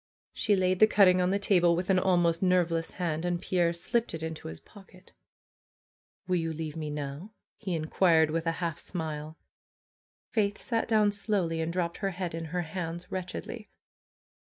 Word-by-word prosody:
She 210 - +2
laid 185 -1 +1
the 215 - +8
cutting 185 -4 +5
on 180 - +2
the 195 - +2
table 175 -4 +3
with 180 +3 0
an 185 - +4
almost 175 -3 +2
nerveless 175 -3 +2
hand, 165 -3 -2
and 175 -1 0
Pierre 175 -1 +1
slipped 195 +4 -1
it 160 - -6
into 160 -1 -5
his 80 0 -8
pocket. 190 -2 -17 1.1
"Will 180 -1 +2
you 165 -1 -1
leave 155 -1 -5
me 155 -2 -4
now?" 150 +7 -6 0.3
he 190 -5 -2
inquired 160 0 +3
with 165 +1 -1
a 165 - +2
half 165 -2 -3
smile. 155 -2 -5 0.9
Faith 205 -2 +1
sat 230 -3 -1
down 215 -2 +4
slowly 195 -5 -1
and 160 +1 -1
dropped 170 -1 -2
her 195 - -1
head 180 -2 -4
in 165 0 -4
her 175 +3 -2
hands 170 +2 -5
wretchedly. 190 +4 -5
175 Hz, 175 wpm, -29 LUFS, 165-190 Hz, 1.1 s, the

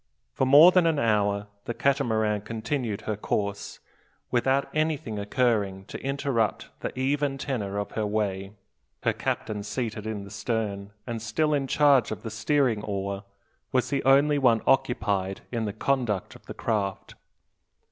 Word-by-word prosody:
For 130 - +1
more 150 +7 +9
than 180 -2 +4
an 160 -2 +2
hour 105 -5 +1 0.2
the 120 - -3
Catamaran 110 -7 +1
continued 110 0 -3
her 110 - -2
course, 100 -1 -3 0.5
without 130 +3 +2
anything 155 -8 -1
occurring 100 -3 0
to - - -8
interrupt 135 -5 -1
the - - -3
"even 140 +1 0
tenor 110 -8 -3
of 105 - -3
her 110 -2 -1
way." 100 -2 -2 0.5
Her - - +2
captain, 105 -2 -3
seated 110 0 -4
in 105 -2 -4
the 100 - -11
stern, 105 -3 -3
and 115 -2 -4
still 150 +6 0
in 140 -2 0
charge 140 -5 +4
of 110 - -6
the 110 - -5
steering 120 -1 +1
oar, 100 -1 -4 0.5
was 125 0 +1
the 140 - 0
only 140 +2 +4
one 120 -4 +3
occupied 100 -7 +1
in 115 -2 -1
the 105 - -2
conduct 115 -5 -1
of - - -17
the - - -7
craft. 100 -4 -2
115 Hz, 155 wpm, -26 LUFS, 105-135 Hz, 0.5 s, more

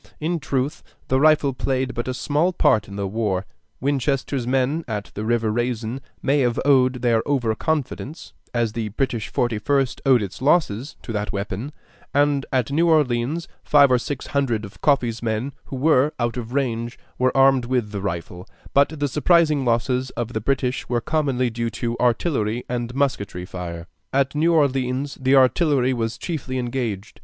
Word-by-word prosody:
In 165 +2 -1
truth, 135 0 -2 0.3
the 130 - +3
rifle 150 -2 +4
played 130 0 -1
but 120 - -4
a 130 - -2
small 155 +7 +1
part 110 - +3
in 100 - -9
the 100 -1 -2
war. 100 -2 -1 0.3
Winchester's 135 -1 -1
men 135 +5 +1
at 105 -3 -4
the 105 - -4
river 115 -1 +1
Raisin 120 +1 -2 0.2
may 140 +2 +2
have 120 -3 +1
owed 130 -3 +3
their 115 -2 +3
over 125 -6 +1
confidence, 150 +3 -3 0.2
as 115 -3 0
the 115 -2 -3
British 120 0 -2
Forty 120 -3 -1
first 135 +2 0
owed 130 -5 +4
its 100 +3 -7
losses, 140 -4 +1
to 115 - -5
that 105 -1 -2
weapon, 100 +7 -4 0.4
and 145 -1 +2
at 130 -2 0
New 165 +4 +3
Orleans 150 +1 +1 0.2
five 140 -2 +5
or 125 - +4
six 135 +2 -5
hundred 120 -7 0
of 100 - -14
Coffee's 120 -6 +2
men, 115 +4 -2
who - - -7
were 145 +1 +3
out 120 -1 0
of 120 -2 -5
range, 120 -3 -2 0.2
were 130 +1 +2
armed 135 -2 +5
with 120 -4 -1
the 100 -2 -4
rifle; 90 -1 -5 0.3
but 145 +2 +3
the 145 - +1
surprising 150 0 +3
losses 125 +2 +1
of 120 0 -3
the 110 - -2
British 130 +1 -1
were 120 -1 +1
commonly 135 -3 0
due 115 +1 -2
to 115 +2 -3
artillery 120 -2 +1
and 120 0 -3
musketry 100 -10 -1
fire. 85 -2 -6 0.3
At 135 0 +1
New 160 +3 +2
Orleans 135 -3 +1
the 130 +1 +4
artillery 130 -1 +3
was 115 -2 -2
chiefly 135 -6 -4
engaged. 120 -5 -3
125 Hz, 175 wpm, -22 LUFS, 115-140 Hz, 0.4 s, five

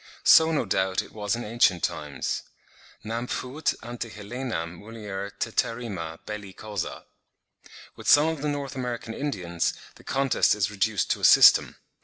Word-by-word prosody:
So 160 0 +7
no 150 -6 0
doubt 95 -1 0
it - - -15
was 105 0 -1
in 120 - -5
ancient 105 -6 +2
times; 70 -3 -2 0.6
"nam 115 +3 -3
fuit 130 +6 -2
ante 120 0 -6
Helenam 105 -6 -5
mulier 105 -3 -6
teterrima 100 -9 -2
belli 105 -2 -7
causa." 105 -3 -5 0.9
With - - -4
some 145 +2 +7
of 160 -3 -2
the 150 - -1
North 140 -2 -4
American 120 -3 -4
Indians, 90 - -2 0.2
the - - -17
contest 135 -3 +2
is 105 0 0
reduced 105 -3 0
to - - -1
a - - -13
system. - - +7
110 Hz, 150 wpm, -26 LUFS, 95-125 Hz, 0.9 s, So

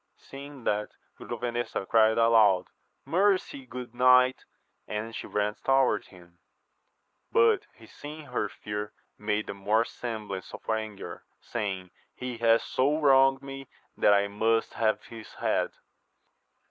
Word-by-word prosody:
Seeing 140 -1 -11
that, 105 -1 0 0.3
Grovenesa 120 -4 -3
cried 110 -1 +4
aloud, 110 -5 +4 0.3
mercy, 185 -7 +1
good 125 -1 -8
knight, 125 +1 +4 0.4
and 105 +2 -4
she - - -6
ran 105 0 0
towards 135 -5 +2
him; 85 -2 -18 0.9
but 450 -3 +4
he - - -16
seeing 150 +1 -10
her 125 -5 -2
fear, 105 +1 -6 0.3
made 105 0 -1
the - - -5
more 105 +3 +1
semblance 105 -7 -6
of - - -14
anger, 110 -2 -4 0.2
saying. 95 -5 -4 0.2
He 125 -2 -6
hath 115 0 +4
so 145 +4 +1
wronged 135 -2 +5
me 135 -1 -8 0.3
that 105 - +5
I 100 0 +2
must 115 +2 0
have 110 -1 0
his 115 -2 -11
head. - - 0
115 Hz, 130 wpm, -28 LUFS, 105-135 Hz, 0.9 s, wronged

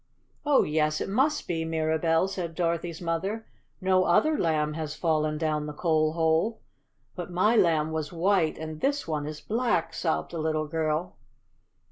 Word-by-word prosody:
"Oh, 290 -2 +5
yes, 155 0 +1
it - - -3
must 275 +8 +1
be, 165 -2 -1
Mirabell," 160 +2 +1
said 175 -4 -5
Dorothy's 170 -1 -2
mother. 190 +7 -2 0.3
"No 185 -1 +3
other 310 - +3
Lamb 155 - +1
has 155 -1 -4
fallen 155 -2 0
down 155 -1 -1
the 150 - -5
coal 155 -2 +1
hole." 165 +7 +1 0.6
"But 180 -2 -5
my 185 +6 +2
Lamb 160 -6 +3
was 155 -2 -3
WHITE, 175 -1 +1
and 155 -1 -7
this 285 +1 0
one 150 -2 -2
is 150 0 -7
BLACK," 210 -8 0
sobbed 165 0 -1
the 170 - -4
little 155 0 0
girl. 160 +2 -2
165 Hz, 160 wpm, -27 LUFS, 155-185 Hz, 0.6 s, Oh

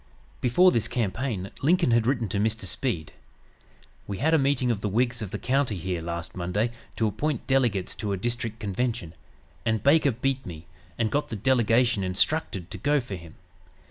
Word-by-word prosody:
Before 180 +10 +5
this 115 -5 +1
campaign 110 -3 -2
Lincoln 170 -1 +3
had 115 -1 +3
written 120 -4 +1
to 100 - -1
Mr. 110 +2 0
Speed: 95 - -2 0.9
"We 100 - -4
had 160 +8 +2
a 160 - +5
meeting 135 -3 +2
of 105 -3 -2
the 105 - -1
Whigs 120 +3 0
of 105 - -4
the - - -4
county 135 -4 0
here 90 0 -3
last 85 0 -5
Monday 95 +6 -1 0.2
to 115 - +1
appoint 115 +6 -1
delegates 120 -9 +1
to 105 -3 -3
a 100 - 0
district 115 +1 -3
convention; 105 -4 -2 0.5
and 110 -2 0
Baker 145 +1 +5
beat 135 +2 -1
me, 80 -2 -9 0.3
and 115 -2 0
got 145 +1 0
the - - -4
delegation 120 -1 +3
instructed 95 - 0
to - - -6
go 145 +1 +2
for 120 -6 -7
him. 85 -3 -9
115 Hz, 180 wpm, -26 LUFS, 100-130 Hz, 0.9 s, Before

